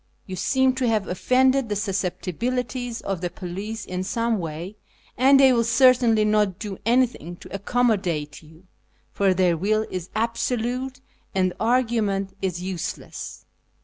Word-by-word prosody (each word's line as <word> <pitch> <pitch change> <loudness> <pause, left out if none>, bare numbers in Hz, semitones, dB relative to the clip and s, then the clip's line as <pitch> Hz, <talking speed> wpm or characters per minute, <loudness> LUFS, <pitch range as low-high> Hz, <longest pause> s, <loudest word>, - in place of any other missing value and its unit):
You 185 - -6
seeiu 260 +7 +2
to 255 -2 +1
have 215 -4 +1
offended 260 +6 +2
the 205 - -1
susceptibilities 230 +5 -2
of 195 -3 -3
the 175 - -1
police 195 +5 -6
in 185 0 -3
some 230 +2 0
way, 170 +4 -6 0.4
and 270 +2 +5
they 265 -1 +7
will 235 -1 +3
certainly 235 -2 +4
not 210 -3 +2
do 205 -3 -6
anything 235 - +1
to - - -13
accom 245 +5 +1
modate 170 -8 -2
you, 160 +2 -18 0.5
for 195 -2 +2
their 180 -2 +3
will 215 +6 +1
is 180 -1 -5
absolute, 240 +3 -2 0.3
and 185 -1 +2
argument 220 -5 +1
is 180 -2 -2
useless. 185 -3 -6
215 Hz, 145 wpm, -24 LUFS, 185-245 Hz, 0.5 s, they